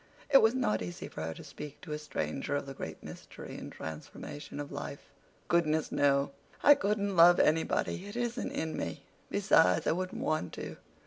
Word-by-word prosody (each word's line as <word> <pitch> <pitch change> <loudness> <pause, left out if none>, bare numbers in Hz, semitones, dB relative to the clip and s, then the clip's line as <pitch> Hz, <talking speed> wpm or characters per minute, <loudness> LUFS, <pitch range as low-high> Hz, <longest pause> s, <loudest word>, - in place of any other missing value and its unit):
It 270 - +9
was 220 +3 +4
not 110 - +1
easy 90 -1 -5
for - - -7
her 80 0 -3
to - - -10
speak 150 -1 -9
to 170 - -9
a 150 - -3
stranger 145 - -3
of 145 - -1
the 135 - -7
great - - -7
mystery - - -9
and - - -7
transformation 110 - -7
of 145 -1 -5
life. 70 -1 -7 0.4
"Goodness, 160 -2 +2
no. 140 0 +3 0.3
I 290 - +10
couldn't 200 -4 0
love 175 +1 +8
anybody. 165 +4 +1
It 205 - -8
isn't 240 0 -2
in 160 0 -2
me. 85 - -4 0.3
Besides 90 0 +4
I - - +3
wouldn't 185 +2 -2
want 155 -13 -1
to. - - -6
155 Hz, 185 wpm, -31 LUFS, 135-185 Hz, 0.4 s, I